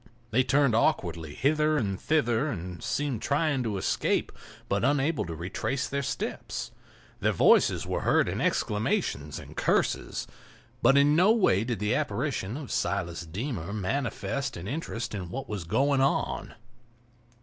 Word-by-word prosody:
They 130 - +4
turned 135 0 +3
awkwardly 85 -8 0
hither 150 - +2
and 100 -7 -2
thither 140 -4 +2
and 90 - -5
seemed 140 -6 -1
trying 145 -1 +1
to 110 -5 -2
escape, - - 0 0.4
but - - 0
unable 145 +3 +2
to 85 - -5
retrace 95 - -2
their 140 0 -2
steps. 140 - -4 0.5
Their - - +2
voices - - +4
were - - -2
heard - - +3
in - - -2
exclamations 105 - 0
and - - -10
curses. - - 0 0.6
But 135 - +5
in 145 +1 +5
no 185 +6 +5
way 185 - +3
did 120 -1 -2
the 105 +4 0
apparition 130 -5 -1
of 145 -4 -7
Silas 85 0 -2
Deemer 100 - -4
manifest 115 +3 -2
an 85 +3 -7
interest 120 -4 -4
in 90 -4 -5
what 135 +8 -5
was 100 -5 -4
going 135 - +2
on. 135 - 0
120 Hz, 150 wpm, -28 LUFS, 95-140 Hz, 0.6 s, But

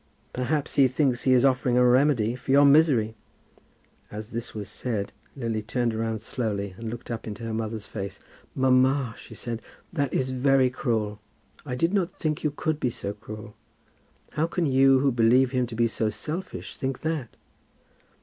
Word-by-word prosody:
"Perhaps 140 +4 -1
he 135 -2 +7
thinks 130 -1 +1
he 130 - +5
is 125 +1 +5
offering 130 -2 +2
a 125 - +5
remedy 125 -3 +3
for 125 - -13
your 140 +2 +6
misery." 140 -7 +5 1.0
As 105 +2 -8
this 115 0 -5
was 105 -2 -5
said 110 -5 -3 0.2
Lily 115 -5 -2
turned 115 +2 -1
round 110 0 -2
slowly 100 -5 -3
and 115 -1 -4
looked 120 +1 -7
up 115 -1 -5
into 110 +1 -6
her 115 -1 -3
mother's 110 -1 -3
face. 100 -2 -6 0.4
"Mamma," 130 -1 +3
she - - -12
said, 115 -1 -5 0.3
"that 145 -5 0
is 130 0 0
very 130 0 +3
cruel. 110 -5 -1 0.5
I 125 - -2
did 165 +8 +1
not 190 -3 +1
think 155 -2 -2
you 150 - +2
could 150 +1 -2
be 125 - +1
so 100 -3 -5
cruel. 105 0 -10 0.8
How 155 +2 0
can 170 0 -1
you, 135 -1 +5
who 140 -1 +3
believe 125 +2 +4
him 125 -2 +1
to 115 - -7
be 115 +1 +3
so 110 -1 0
selfish, 160 - -6
think 130 -1 -3
that?" 155 -7 -3
125 Hz, 180 wpm, -26 LUFS, 110-135 Hz, 1.0 s, he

